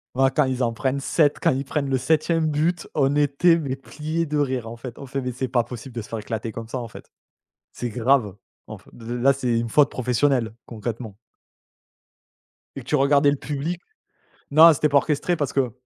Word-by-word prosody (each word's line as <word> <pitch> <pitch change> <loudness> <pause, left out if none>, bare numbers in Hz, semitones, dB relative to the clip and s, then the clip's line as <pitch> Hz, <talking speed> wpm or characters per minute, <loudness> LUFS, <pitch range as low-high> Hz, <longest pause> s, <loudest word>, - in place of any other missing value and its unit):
Waouh 135 0 +4
quand - - +3
ils 130 -1 -1
en 115 - +1
prennent 130 +4 -2
7 145 +1 +2
quand - - +3
ils 135 +1 -2
prennent 140 -2 -2
le 135 - +2
7e 160 +4 +1
but, 155 +3 0
on 140 -1 +2
était 150 +4 +3
mais 135 -4 -3
pliés 155 +4 -4
de 150 -1 -2
rire 130 -5 -1
en 115 +1 -8
fait. 120 0 -9
On - - -8
fait: 135 +1 -4
«Mais 125 -1 -4
c'est 130 +1 -3
pas 120 -1 +1
possible 125 +1 -9
de 115 - -4
se 105 - -11
faire 115 - -5
éclater 110 +1 -5
comme 115 -1 -7
ça 130 - -4
en 120 - -5
fait. - - -13 0.6
C'est 120 - -4
grave 115 -3 +1 0.3
en - - -9
f - - -23
de 115 - -13
de 120 - -4
là 135 +3 +3
c'est 125 -3 0
une 115 - -2
faute 145 +4 +4
professionnelle 125 -2 0
concrètement». 110 -2 -6 1.6
Et 135 - -7
tu 135 - 0
regardais 140 0 +4
le 145 - -1
public 155 +6 -4 0.7
non 160 +3 +9
c'était 150 +1 +1
pas 145 - +4
orchestré 150 +4 0
parce 145 -4 -2
que 130 -3 +1
135 Hz, 215 wpm, -23 LUFS, 120-145 Hz, 1.6 s, non